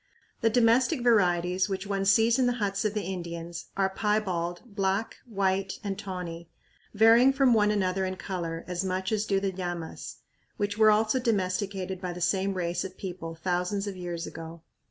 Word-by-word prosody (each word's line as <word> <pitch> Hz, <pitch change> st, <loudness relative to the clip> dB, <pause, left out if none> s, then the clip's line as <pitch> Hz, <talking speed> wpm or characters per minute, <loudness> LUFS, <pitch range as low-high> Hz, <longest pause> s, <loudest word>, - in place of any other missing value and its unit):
The 225 Hz, -, +4 dB
domestic 245 Hz, +4 st, +3 dB
varieties, 185 Hz, -4 st, +3 dB
which 190 Hz, 0 st, -3 dB
one 195 Hz, -1 st, -1 dB
sees 225 Hz, +5 st, +4 dB
in 255 Hz, -, +3 dB
the 245 Hz, -, +2 dB
huts 200 Hz, -2 st, -1 dB
of 210 Hz, 0 st, 0 dB
the 210 Hz, -, -1 dB
Indians, 170 Hz, -2 st, -5 dB
are 195 Hz, -1 st, +3 dB
piebald, 190 Hz, -5 st, -1 dB
black, 200 Hz, -1 st, -1 dB
white, 195 Hz, -3 st, -1 dB
and 200 Hz, -2 st, -2 dB
tawny, 180 Hz, -4 st, -6 dB, 0.5 s
varying 230 Hz, +5 st, +6 dB
from 270 Hz, -2 st, +4 dB
one 210 Hz, -2 st, +4 dB
another 190 Hz, -2 st, 0 dB
in 185 Hz, 0 st, -3 dB
color 170 Hz, -4 st, -5 dB
as 180 Hz, 0 st, -2 dB
much 190 Hz, +1 st, -2 dB
as 215 Hz, -1 st, 0 dB
do 195 Hz, -1 st, +2 dB
the 195 Hz, 0 st, -1 dB
llamas, 175 Hz, -3 st, -5 dB, 0.4 s
which 205 Hz, -2 st, -1 dB
were 215 Hz, 0 st, +6 dB
also 215 Hz, +4 st, +3 dB
domesticated 190 Hz, -4 st, -1 dB
by 180 Hz, -2 st, -3 dB
the 175 Hz, -, -8 dB
same 190 Hz, +2 st, +1 dB
race 175 Hz, -1 st, -1 dB
of 190 Hz, -1 st, -8 dB
people 175 Hz, -3 st, -6 dB
thousands 180 Hz, +4 st, -1 dB
of 200 Hz, -2 st, -5 dB
years 175 Hz, -2 st, -5 dB
ago. 165 Hz, 0 st, -9 dB
190 Hz, 175 wpm, -28 LUFS, 180-210 Hz, 0.5 s, varying